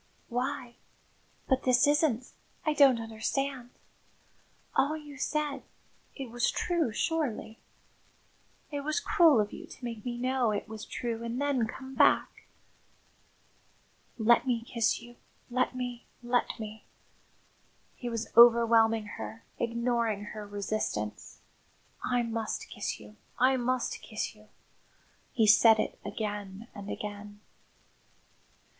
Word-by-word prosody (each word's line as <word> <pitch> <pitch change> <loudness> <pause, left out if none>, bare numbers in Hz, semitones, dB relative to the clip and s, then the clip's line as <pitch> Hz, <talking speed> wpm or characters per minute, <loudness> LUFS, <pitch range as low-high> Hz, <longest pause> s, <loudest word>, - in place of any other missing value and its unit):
"Why 250 0 -3 0.7
but 265 -1 +2
this 250 -1 +4
isn't 290 -5 +2 0.3
I 310 - +2
don't 275 -5 +6
understand! 245 +3 -3 1.1
All 300 +3 +2
you 295 -2 -11
said 300 -1 -1 0.5
it 265 -5 -6
was 240 0 +1
true, 340 -8 0
surely? 235 -7 -2 1.1
It 290 - -2
was 305 +5 -1
cruel 340 - +5
of 210 -1 0
you - - -8
to 250 - -10
make 230 -3 -5
me 240 -1 -3
know 255 -1 +1
it 205 -1 -2
was 220 0 -7
true 230 -2 -4
and 235 +2 -3
then 280 -5 +1
come 265 +3 -8
back!" - - +3 1.7
"Let 235 +3 +4
me 235 -2 +1
kiss 235 0 0
you 240 0 -14 0.3
let 255 +1 +1
me, 245 -1 -5 0.2
let 240 0 0
me!" 215 0 -7 1.1
He 245 - -5
was 230 -1 -4
overwhelming 230 -2 +6
her, 225 - -7 0.2
ignoring 235 -3 0
her 210 -1 -7
resistance. 200 - -3 0.6
"I 245 -1 +1
must 225 -1 -3
kiss - - -4
you, 210 - -14 0.2
I 260 +1 +4
must 255 0 -1
kiss 215 - -4
you." 215 0 -20 0.8
He 225 -5 +3
said 220 +1 +7
it - - -2
again 210 0 -5
and 200 0 -8
again. 205 0 -6
235 Hz, 125 wpm, -30 LUFS, 220-260 Hz, 1.7 s, said